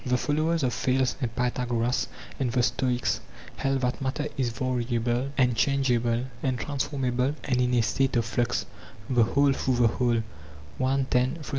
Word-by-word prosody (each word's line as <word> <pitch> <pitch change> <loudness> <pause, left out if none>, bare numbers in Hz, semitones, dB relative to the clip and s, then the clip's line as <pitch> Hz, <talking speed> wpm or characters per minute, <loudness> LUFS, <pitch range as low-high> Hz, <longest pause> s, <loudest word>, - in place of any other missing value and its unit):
The 125 0 +1
followers 155 +4 0
of 125 -2 +1
Thales 130 -1 +1
and 120 -2 -2
Pythagoras 125 0 0 0.3
and 130 -3 0
the 125 0 +2
Stoics 125 -1 0 0.4
held 135 -1 0
that 125 +1 -1
matter 135 +3 -1
is 130 -3 0
variable 120 +1 -1
and 125 -3 +3
changeable 120 -1 +1 0.2
and 130 -2 0
transformable 135 -1 -1
and 125 -2 +1
in 125 0 +2
a 120 - +4
state 135 +4 +1
of 115 -1 +2
flux, 120 +1 0 0.4
the 125 -2 +3
whole 140 +5 +3
through 130 -1 0
the 120 -1 +4
whole. 120 -1 +1
125 Hz, 150 wpm, -27 LUFS, 120-135 Hz, 0.4 s, a